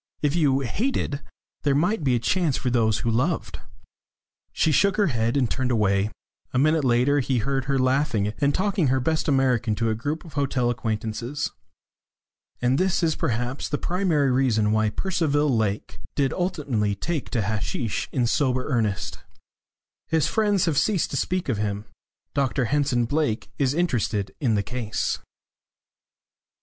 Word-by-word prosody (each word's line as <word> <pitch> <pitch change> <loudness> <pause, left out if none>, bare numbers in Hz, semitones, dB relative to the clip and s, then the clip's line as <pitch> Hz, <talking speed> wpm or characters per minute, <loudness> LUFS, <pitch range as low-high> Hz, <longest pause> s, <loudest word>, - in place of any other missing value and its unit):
If 145 +1 +2
you 140 -5 +3
hated, 145 - -1 0.4
there 140 -2 +2
might 175 +5 +1
be 130 -3 +3
a - - +1
chance 165 +3 +1
for 125 - -1
those 110 -3 +2
who 115 - +2
loved." 145 +9 -1 0.9
She 160 - +1
shook 190 +7 +3
her 200 -9 +2
head 115 +3 +1
and 130 -3 +2
turned 130 +2 -1
away. 105 -3 +2 0.4
A - - 0
minute 155 +3 +3
later 130 +3 +3
he 130 -1 0
heard 135 +3 -1
her 135 0 +1
laughing, 130 -5 +1
and 140 0 +4
talking 190 -5 +1
her 130 +1 +2
best 160 +6 0
American 125 -5 +2
to 115 0 0
a - - +1
group 145 +10 -3
of 160 - -12
hotel 135 -4 +1
acquaintances. 115 +3 -3 1.1
And 125 +2 +3
this 185 -1 +1
is 160 -1 +3
perhaps 125 +3 -2
the 145 - 0
primary 170 -7 +1
reason 115 -5 +2
why 110 0 +2
Percival 150 - +1
Lake 105 -2 -2 0.2
did 140 -2 +1
ultimately 140 - -1
take 150 - -3
to 115 - 0
hasheesh 105 +1 -2
in 125 -3 +1
sober 130 +1 +1
earnest. 110 -7 -1 0.9
His 160 -2 +2
friends 205 -4 +2
have 155 -4 +2
ceased 190 +2 +1
to - - -3
speak 185 +6 -1
of 115 -6 -1
him. 105 0 -2 0.5
Dr 135 -2 +1
Henson 135 -2 +1
Blake 145 -3 -1
is 135 0 +2
interested 110 - 0
in 120 -6 +1
the 100 - +1
case. 115 -1 -2
130 Hz, 160 wpm, -24 LUFS, 115-150 Hz, 1.1 s, and